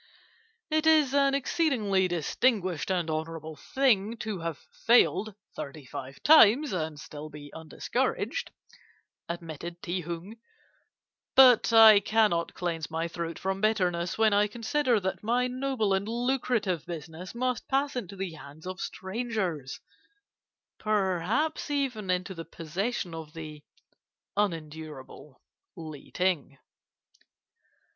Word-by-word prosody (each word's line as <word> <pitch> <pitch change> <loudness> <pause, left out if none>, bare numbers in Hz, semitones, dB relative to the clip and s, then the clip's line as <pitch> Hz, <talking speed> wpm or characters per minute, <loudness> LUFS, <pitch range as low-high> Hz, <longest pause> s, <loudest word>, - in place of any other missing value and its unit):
"'It 310 0 +2
is 305 -4 +5
an 275 -1 +3
exceedingly 245 - +1
distinguished 180 - 0
and 180 -3 0
honourable 160 0 -4
thing 230 - +1
to 215 -4 -4
have 165 -2 -4 0.3
failed 220 -3 +4 0.2
thirty 140 0 -7
five 130 +1 -8
times, 290 -2 +7
and 160 -4 -3
still 150 +1 -8
to - - -21
be 145 -1 -10
undiscouraged,' 160 -1 -2 0.8
admitted 170 0 -6
Ti 180 +1 -2
Hung; 170 +6 -7 1.0
'but 250 -3 +7
I 220 -2 +9
cannot 205 -5 +1
cleanse 165 -3 -3
my 165 +1 -2
throat 170 0 -5
from 190 0 -2
bitterness 180 -5 +1
when 220 -1 +4
I 205 +1 +4
consider 240 +2 +1
that 190 0 -3
my 240 +3 +1
noble 250 -5 0
and 195 +2 0
lucrative 235 - 0
business 165 +4 -7
must 250 0 -2
pass 275 +1 0
into 200 -6 -5
the 190 -2 -4
hands 155 0 -12
of 185 +1 -6
strangers, 190 - -3 1.0
perhaps 215 - 0
even 260 -9 -2
into 180 +1 -1
the 165 -2 -7
possession 175 +5 -4
of 160 -2 -8
the 155 -2 -8 0.7
unendurable 155 -7 -4 0.3
Li 155 -4 -9
Ting. 175 -7 -1
190 Hz, 120 wpm, -28 LUFS, 165-230 Hz, 1.0 s, I